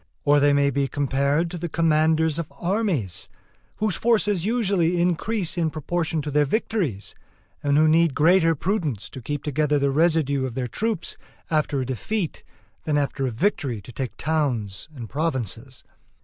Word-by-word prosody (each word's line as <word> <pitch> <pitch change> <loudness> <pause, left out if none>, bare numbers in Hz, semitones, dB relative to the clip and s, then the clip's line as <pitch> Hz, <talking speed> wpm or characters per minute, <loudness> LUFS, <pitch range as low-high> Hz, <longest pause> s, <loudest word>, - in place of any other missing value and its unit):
Or 145 0 +5
they 145 0 +4
may 140 0 +3
be 140 +1 0
compared 140 +4 0
to 175 - -5
the 170 +1 -3
commanders 160 0 +2
of 165 - -5
armies, 175 - -1 0.5
whose 215 -3 0
forces 210 -6 +2
usually 195 -7 +1
increase 180 +1 0
in 165 -2 +2
proportion 160 +1 -2
to 150 - -4
their 150 +1 +3
victories, 150 - -2 0.5
and 145 0 +2
who 155 +1 +5
need 160 -2 +3
greater 165 +1 +4
prudence 145 - -2
to 130 - -8
keep 145 +4 -4
together 150 0 +1
the 140 -1 +1
residue 150 -3 +2
of 120 - -8
their 130 -1 -1
troops 215 - -3 0.3
after 150 -3 +1
a - - -2
defeat 165 - -3 0.4
than 150 -2 0
after 140 -1 -1
a - - 0
victory 135 - 0
to 100 - -12
take 120 -3 -5
towns 130 -9 -1
and 120 -4 -7
provinces. 130 - -3
155 Hz, 165 wpm, -24 LUFS, 135-170 Hz, 0.5 s, Or